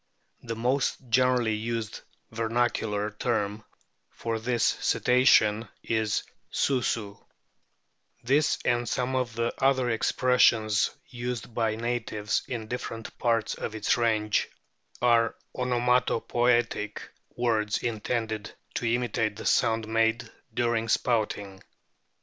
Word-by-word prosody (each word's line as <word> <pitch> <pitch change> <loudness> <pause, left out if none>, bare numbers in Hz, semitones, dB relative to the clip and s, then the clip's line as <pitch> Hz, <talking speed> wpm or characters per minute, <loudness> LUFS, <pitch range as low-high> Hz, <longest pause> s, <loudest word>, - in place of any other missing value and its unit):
The 115 -2 -5
most 125 +4 0
generally 125 -1 +3
used 115 0 -3 0.3
vernacular 110 -2 0
term 105 -1 -2 0.5
for 115 -1 -4
this 120 0 0
Cetacean 115 -3 +3 0.2
is 110 -2 0 0.3
Susu; 115 -6 -1 1.0
this 140 +5 +2
and 120 0 +1
some 130 +1 -1
of 125 -3 -1
the 115 0 -1
other 130 -2 +3
expressions 115 -2 +3 0.2
used 120 -2 -5
by 110 -1 0
natives 115 -2 -1
in 115 -3 -4
different 115 -1 -6
parts 115 -3 +1
of 110 - -5
its 105 - +2
range 110 -3 +1 0.5
are 115 -2 +4 0.2
onomatopoetic 120 -2 +1 0.4
words 110 -3 +1
intended 110 -1 -3 0.2
to 115 -2 -1
imitate 115 -3 0
the - - -8
sound 110 -1 +2
made 115 +1 +1 0.2
during 115 -1 0
spouting. 105 -5 0
115 Hz, 105 wpm, -27 LUFS, 110-120 Hz, 1.0 s, are